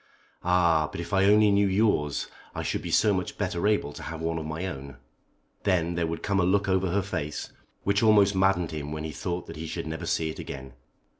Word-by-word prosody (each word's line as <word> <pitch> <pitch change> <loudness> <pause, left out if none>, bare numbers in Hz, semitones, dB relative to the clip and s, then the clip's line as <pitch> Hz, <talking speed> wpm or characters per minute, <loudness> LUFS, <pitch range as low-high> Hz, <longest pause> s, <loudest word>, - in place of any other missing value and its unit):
"Ah! 85 -3 +3
but - - -6
if 85 +1 -6
I 95 0 +4
only 105 +1 +6
knew 100 0 +4
yours 95 -8 +1 0.3
I - - -3
should - - -1
be - - -5
so 105 -2 +4
much 90 -1 -3
better 85 +4 -1
able 105 -9 +1
to - - -9
have 80 +1 -6
one 80 0 -1
of 80 - -5
my 80 +4 -3
own." 70 -6 -6 0.6
Then 85 -3 +1
there 85 -1 0
would 80 0 -4
come 100 -1 +1
a - - +3
look 100 +3 +2
over 95 -1 +2
her 100 +3 +1
face 75 -6 -4 0.3
which 100 +1 +2
almost 105 -3 +5
maddened 95 -3 +2
him 75 -2 -5
when 75 0 -4
he 80 - -4
thought 90 +3 -4
that 80 - -9
he 80 +1 -5
should - - -4
never 80 0 -5
see 80 -1 0
it - - -10
again. 65 -1 -7
85 Hz, 230 wpm, -27 LUFS, 80-100 Hz, 0.6 s, only